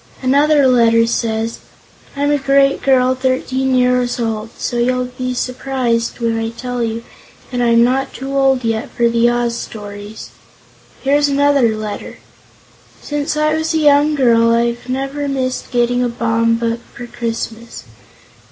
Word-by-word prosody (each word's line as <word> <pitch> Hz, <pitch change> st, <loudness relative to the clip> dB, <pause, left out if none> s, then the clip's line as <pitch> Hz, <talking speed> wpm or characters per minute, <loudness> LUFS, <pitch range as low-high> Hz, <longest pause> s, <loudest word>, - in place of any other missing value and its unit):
Another 285 Hz, +2 st, +3 dB
letter 230 Hz, -2 st, +4 dB
says: 225 Hz, -1 st, -2 dB, 0.6 s
"I'm 285 Hz, +1 st, 0 dB
a 290 Hz, -, +2 dB
great 275 Hz, 0 st, +2 dB
girl 260 Hz, -1 st, +3 dB
13 260 Hz, 0 st, -1 dB
years 250 Hz, -1 st, +1 dB
old, 225 Hz, -1 st, -3 dB
so 240 Hz, -, -3 dB
you'll 250 Hz, +1 st, +1 dB
be 255 Hz, 0 st, -3 dB
surprised 250 Hz, -2 st, -2 dB
when 230 Hz, -1 st, 0 dB
I 225 Hz, 0 st, -2 dB
tell 245 Hz, +1 st, -5 dB
you 230 Hz, 0 st, -3 dB, 0.5 s
I -, -, -2 dB
am 235 Hz, -1 st, +4 dB
not 265 Hz, +2 st, 0 dB
too 270 Hz, +1 st, -6 dB
old 270 Hz, -2 st, +2 dB
yet 225 Hz, +3 st, -2 dB
for 235 Hz, -1 st, +1 dB
the 235 Hz, 0 st, +3 dB
Oz 240 Hz, -1 st, 0 dB
stories." 205 Hz, -1 st, -8 dB, 0.7 s
Here's 290 Hz, +2 st, +3 dB
another 280 Hz, -5 st, +2 dB
letter: 215 Hz, -1 st, -6 dB, 0.8 s
"Since 295 Hz, +1 st, -3 dB
I 305 Hz, 0 st, +2 dB
was 315 Hz, +1 st, -1 dB
a -, -, +3 dB
young 295 Hz, 0 st, +4 dB
girl 230 Hz, -4 st, +3 dB
I've 235 Hz, +1 st, -1 dB
never 275 Hz, +2 st, -3 dB
missed 260 Hz, -2 st, -2 dB
getting 245 Hz, 0 st, +1 dB
a 245 Hz, -, 0 dB
Baum 230 Hz, -1 st, +1 dB
book 230 Hz, 0 st, -2 dB, 0.2 s
for 240 Hz, -, -7 dB
Christmas. 230 Hz, -1 st, -5 dB
245 Hz, 150 wpm, -17 LUFS, 230-270 Hz, 0.8 s, letter